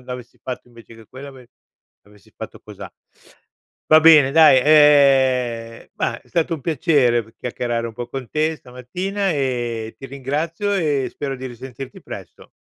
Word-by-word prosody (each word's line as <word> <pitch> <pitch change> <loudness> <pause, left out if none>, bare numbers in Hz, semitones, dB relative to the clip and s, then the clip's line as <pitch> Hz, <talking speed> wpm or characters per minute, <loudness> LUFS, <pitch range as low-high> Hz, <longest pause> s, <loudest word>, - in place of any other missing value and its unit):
non 125 - -22
avessi 125 -1 -9
fatto 125 -1 -7
invece 115 -1 -16
che 115 -1 -16
quello, 135 +2 -10
ave 130 -3 -15 0.6
avessi 105 -2 -22
fatto - - -9
cosà.“ - - -11 1.0
Va 155 0 +8
bene 155 -4 +6
dai, 155 -4 +6
ehm, 130 -6 +3
ma, - - -3
è - - -27
stato 165 0 -1
un 155 - -8
piacere 135 -5 +1
p 110 - -19
chiacchierare 120 -1 -3
un 115 - -8
po' 120 +2 -7
con 130 -1 -7
te 155 +1 -1
stamattina, 180 +12 -4
e 120 -6 -3
ti 135 - -9
ringrazio, 150 +9 -3
e 150 -7 0
spero 135 -2 -5
di 130 +1 -7
risentirti 130 +2 -10
presto. - - -11
130 Hz, 160 wpm, -20 LUFS, 120-150 Hz, 1.0 s, Va